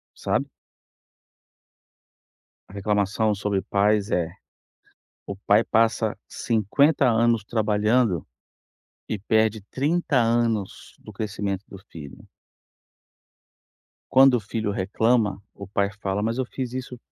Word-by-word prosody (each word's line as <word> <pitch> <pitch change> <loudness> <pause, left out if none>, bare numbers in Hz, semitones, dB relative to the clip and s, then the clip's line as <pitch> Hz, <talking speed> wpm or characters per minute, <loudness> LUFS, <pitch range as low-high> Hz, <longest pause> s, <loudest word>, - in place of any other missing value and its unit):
sabe? - - -1 2.2
A - - -15
reclamação 105 +1 0
sobre 100 -1 -1
pais 105 +1 +1
é: 85 -1 0 1.0
o 100 - -5
pai 100 +3 +3
passa 115 -1 +1
50 130 +6 +2
anos 115 -1 +2
trabalhando 105 - +1 0.8
e 110 - -2
perde 110 +1 +1
30 145 - -1
anos 115 -3 -1
do - - -12
crescimento 100 -2 -4
do 95 - -10
filho 75 -4 -11 1.9
quando 135 0 +6
o 120 - +2
filho 105 0 -3
reclama, 105 +1 +1
o 100 - -9
pai 100 0 0
fala: 100 +1 -2
"Mas 115 +3 -1
eu 130 - 0
fiz 125 0 -5
isso 125 -1 -6
110 Hz, 110 wpm, -24 LUFS, 100-120 Hz, 2.2 s, quando